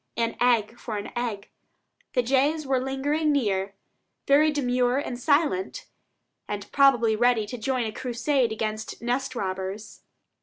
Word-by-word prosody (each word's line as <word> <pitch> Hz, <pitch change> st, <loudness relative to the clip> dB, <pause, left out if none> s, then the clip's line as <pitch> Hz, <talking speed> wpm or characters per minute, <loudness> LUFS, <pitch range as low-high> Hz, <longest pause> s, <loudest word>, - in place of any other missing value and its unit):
An 230 Hz, 0 st, 0 dB
egg 235 Hz, -1 st, +2 dB
for 220 Hz, -3 st, -4 dB
an 205 Hz, -, -6 dB
egg. 225 Hz, -4 st, -4 dB, 0.6 s
The 250 Hz, -, +2 dB
jays 280 Hz, +5 st, +1 dB
were 265 Hz, -1 st, +1 dB
lingering 285 Hz, +4 st, 0 dB
near, 200 Hz, -8 st, 0 dB, 0.5 s
very 295 Hz, +3 st, +5 dB
demure 250 Hz, -3 st, +1 dB
and 250 Hz, -3 st, -3 dB
silent, 285 Hz, -, +1 dB, 0.6 s
and 205 Hz, -1 st, -5 dB
probably 245 Hz, -6 st, +4 dB
ready 235 Hz, -1 st, +3 dB
to 245 Hz, +4 st, -6 dB
join 250 Hz, +1 st, -1 dB
a 220 Hz, -, -3 dB
crusade 245 Hz, +1 st, 0 dB
against 215 Hz, 0 st, -4 dB
nest 250 Hz, +2 st, -1 dB
robbers. 195 Hz, +1 st, -5 dB
245 Hz, 140 wpm, -26 LUFS, 215-270 Hz, 0.6 s, very